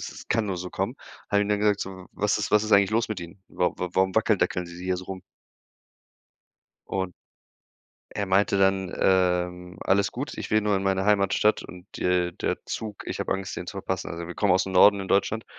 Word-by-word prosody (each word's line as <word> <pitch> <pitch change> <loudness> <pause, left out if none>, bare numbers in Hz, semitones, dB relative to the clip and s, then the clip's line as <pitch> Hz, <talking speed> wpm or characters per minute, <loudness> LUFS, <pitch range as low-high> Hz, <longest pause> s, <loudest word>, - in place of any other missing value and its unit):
„Es - - -8
kann 110 -2 +1
nur 95 -2 -2
so 90 +1 -5
kommen.“ 95 +6 -2 0.4
Haben 100 0 +3
ihm 105 - -3
dann 105 0 +1
gesagt: 105 -1 +2
„So, 95 -1 -6
was 105 +1 0
ist 105 - -2
was 105 0 +4
ist 110 - -2
eigentlich 100 -1 +5
los 115 +1 +1
mit 110 -4 -4
Ihnen? 85 +3 -10
Wa 90 - 0
wa 90 - -3
warum 95 0 +2
wackeldackeln 95 -5 +1
sie 85 +1 -10
hier 95 0 0
so 90 - -7
rum?“ 95 0 -7 1.7
Und 95 -2 -2 1.0
er 100 - 0
meinte 100 +1 +2
dann, 95 -1 +2
ähm: 90 -1 +1
„Alles 100 +1 +2
gut, 135 +4 -5
ich - - -5
will 110 0 +3
nur 105 -1 +1
in 95 - 0
meine 95 -1 +1
Heimatstadt 105 +1 +3
und, 90 +2 -12
äh, 90 -1 +1
der - - -2
Zug 105 -3 -5
ich - - -4
habe - - -3
Angst, 95 -1 -5
den - - -5
zu - - -7
verpassen.“ - - -3
Also, 85 0 -5
wir 90 - -7
kommen 100 -3 +2
aus'm 95 +1 +1
Norden 100 +2 +6
in 95 - -6
Deutschland, 105 +3 +1
95 Hz, 215 wpm, -26 LUFS, 90-105 Hz, 1.7 s, Norden